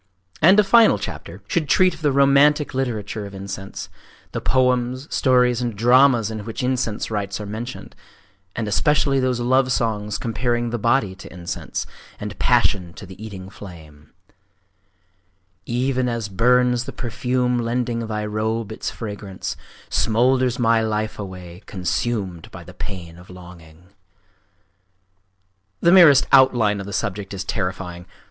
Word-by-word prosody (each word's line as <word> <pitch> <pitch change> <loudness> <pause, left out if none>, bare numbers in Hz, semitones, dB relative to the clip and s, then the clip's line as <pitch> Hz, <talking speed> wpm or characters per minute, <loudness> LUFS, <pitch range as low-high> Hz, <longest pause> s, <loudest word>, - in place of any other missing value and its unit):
And 185 +6 +7
a - - +6
final 225 +3 +5
chapter - - -8
should 160 -6 -1
treat 185 +4 +4
of - - -13
the 150 -2 +2
romantic 140 +2 +4
literature 110 -5 -3
of 100 - -11
incense,—the 95 0 -8
poems, 125 +1 +1
stories, 125 -2 +3
and 120 -3 -2
dramas 120 0 +4
in 110 -1 -5
which 115 +5 -5
incense 125 -4 -1
rites 100 -2 -3
are 105 - -6
mentioned; 115 +5 -7 0.6
and 115 -2 -3
especially 140 +5 +2
those 130 -2 0
love 130 +2 +2
songs 105 -3 -1
comparing 120 +1 -1
the 120 - -2
body 115 -3 +1
to 95 - -12
incense, 85 -1 -5 0.3
and - - -7
passion 90 -4 +2
to 100 - -10
the 95 +3 -11
eating 95 -4 -8
flame:— 80 -7 -13 1.6
Even 125 +1 0
as 115 -3 -3
burns 125 +4 +2
the 135 - -6
perfume 125 +1 -1
lending 120 -1 -2
thy 105 -1 -3
robe 110 +1 -2
its 110 - -4
fragance, 105 -3 -6 0.4
Smoulders 125 +2 +2
my 115 -2 +3
life 110 -1 -2
away, 90 -2 -8
consumed 95 -1 -3
by 90 - -11
the 90 +2 -13
pain 85 -4 -8
of 90 - -16
longing! 90 -1 -14 1.9
….The 170 - +4
merest 160 -7 +7
outline 115 -6 +4
of 100 - -7
the - - -6
subject 100 0 -3
is 95 - -4
terrifying! 90 -3 -4
115 Hz, 140 wpm, -21 LUFS, 100-125 Hz, 1.9 s, And